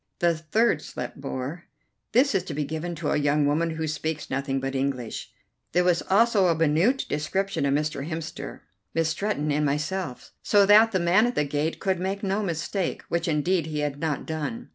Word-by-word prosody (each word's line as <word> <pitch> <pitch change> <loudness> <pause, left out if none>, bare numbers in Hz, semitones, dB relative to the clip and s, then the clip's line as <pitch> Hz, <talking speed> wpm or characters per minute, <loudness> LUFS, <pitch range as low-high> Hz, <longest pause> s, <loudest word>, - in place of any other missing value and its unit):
The 170 -1 +2
third 165 +2 +1
slip - - -6
bore: 135 +4 -5 0.5
"This 255 +4 +4
is 195 - +2
to 160 - -5
be 150 - 0
given 160 +4 -4
to 155 -1 -2
a - - +2
young 145 0 +2
woman 155 +4 +1
who 160 0 -2
speaks 155 0 -3
nothing 135 0 -1
but 135 0 -3
English." 130 -3 -3 0.4
There 180 +2 +4
was 175 -1 +3
also 205 -1 +4
a 170 - +3
minute 165 - +2
description 155 +2 -1
of 140 - +2
Mr. 150 0 -2
Hemster, 160 -1 -6 0.3
Miss 165 -1 +2
Stretton, 165 -4 -1
and 150 +1 +1
myself, 150 0 -2
so 205 -1 +4
that 215 +3 +7
the 190 - +1
man 180 +7 +4
at 245 - -3
the 150 - +2
gate 145 +3 -2
could 190 -2 0
make 195 +2 -3
no 195 +2 0
mistake, 180 0 -2
which 170 0 0
indeed 165 +2 +1
he 150 -1 -2
had 145 -1 -2
not 155 -3 -2
done. 160 +10 -4
160 Hz, 195 wpm, -26 LUFS, 150-190 Hz, 0.5 s, that